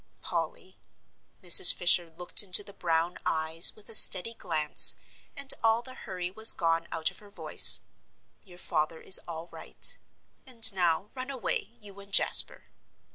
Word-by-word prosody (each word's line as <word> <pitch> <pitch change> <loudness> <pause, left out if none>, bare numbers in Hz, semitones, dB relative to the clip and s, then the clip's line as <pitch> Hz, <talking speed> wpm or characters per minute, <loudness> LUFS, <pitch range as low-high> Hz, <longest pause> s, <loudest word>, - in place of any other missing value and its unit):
"Polly," - - -10 0.6
Mrs. 175 0 +6
Fisher 175 -1 -2
looked 175 +2 -1
into 200 0 +1
the 200 - -18
brown 165 0 -7
eyes 160 +1 +1
with 215 - -22
a - - -12
steady 215 +1 +3
glance, 155 -8 +1 0.4
and 280 -1 0
all 225 +1 -3
the 255 - -16
hurry 180 -7 -11
was 220 +3 +5
gone 165 0 -6
out 160 -1 -6
of - - -16
her 205 - -21
voice, 200 - +5 0.6
"your 180 -4 -21
father 160 -1 -5
is 190 - +2
all 165 0 -12
right. - - -5 0.5
And 230 -4 +3
now, 180 +1 -5
run 260 0 -12
away, 245 -2 -9
you 200 -2 -16
and 200 0 -19
Jasper." - - +3
185 Hz, 155 wpm, -23 LUFS, 165-220 Hz, 0.6 s, Mrs